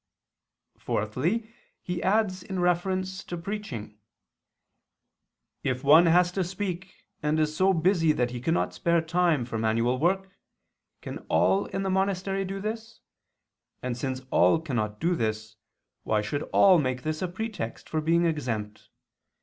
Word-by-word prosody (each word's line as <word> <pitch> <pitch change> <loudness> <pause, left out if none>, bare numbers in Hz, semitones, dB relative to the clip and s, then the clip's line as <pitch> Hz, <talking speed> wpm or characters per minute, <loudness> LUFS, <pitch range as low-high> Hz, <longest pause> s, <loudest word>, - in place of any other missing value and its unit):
Fourthly, 170 - -1 0.3
he 180 -1 -3
adds 190 -2 +1
in 190 0 -5
reference 185 +2 0
to 175 - -6
preaching 190 - -5 1.8
[*Cap. - - -15
xviii]: - - +3
"If 125 - -13
one 155 +5 +7
has 175 +1 +4
to 190 +1 -1
speak, 185 0 -5 0.2
and 150 +1 +1
is 155 0 0
so 190 +3 +4
busy 170 -2 +3
that 125 -5 0
he 120 -1 -5
cannot 165 +6 0
spare 170 -2 +2
time 165 -5 +1
for 115 -2 -4
manual 115 +3 +1
work, 190 +4 +1 0.7
can - - -6
all 195 +1 +3
in 195 - -3
the 190 - -1
monastery 195 0 0
do 195 +1 -4
this? 225 +2 -5 0.8
And 125 -1 -2
since 130 +1 -3
all 165 - +4
cannot 110 -9 -3
do 175 +2 +1
this, 110 -5 -2 0.5
why 110 -1 0
should 145 +7 -2
all 190 -3 +6
make 130 -3 -2
this 155 0 -2
a 185 - 0
pretext 190 - -5
for 155 - -1
being 170 +2 +2
exempt? 115 -10 -3
170 Hz, 150 wpm, -27 LUFS, 130-190 Hz, 1.8 s, one